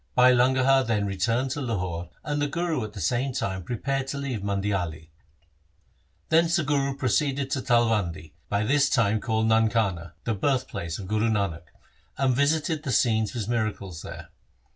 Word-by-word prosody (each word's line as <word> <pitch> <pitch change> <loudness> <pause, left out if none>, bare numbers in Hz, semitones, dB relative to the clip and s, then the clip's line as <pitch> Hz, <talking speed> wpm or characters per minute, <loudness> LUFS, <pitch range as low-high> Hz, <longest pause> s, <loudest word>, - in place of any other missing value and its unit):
Bhai 125 0 +7
Langaha 130 +2 +4
then 110 -4 0
re 100 -1 -3
turned 115 +7 0
to 145 - -3
Lahore, 90 -8 -3
and 145 -1 -2
the 145 - +1
Guru 165 -3 -1
at 105 -1 -7
the 105 - -8
same 120 - 0
time 95 -5 -2
prepared 135 +6 -2
to 140 - -4
leave 140 -5 -3
Mandiali. 95 -6 -2 1.2
Thence 165 +1 +4
the 170 - +2
Guru 140 -1 0
proceeded 135 +2 0
to 140 - 0
Talwandi, 105 - +1 0.2
by 100 +1 +1
this 140 +4 +3
time 110 -5 +2
called 110 -1 0
Nankana, 110 -7 +1
the 115 - -1
birthplace 110 - -1
of 95 - -7
Guru 110 +2 +1
Nanak, 95 -6 -1 0.5
and 130 -2 +2
visited 155 +3 +1
the 140 - -3
scenes 110 -1 +2
of - - -10
his 110 -4 -3
miracles 110 -7 -2
there. - - -9
115 Hz, 170 wpm, -26 LUFS, 100-135 Hz, 1.2 s, Bhai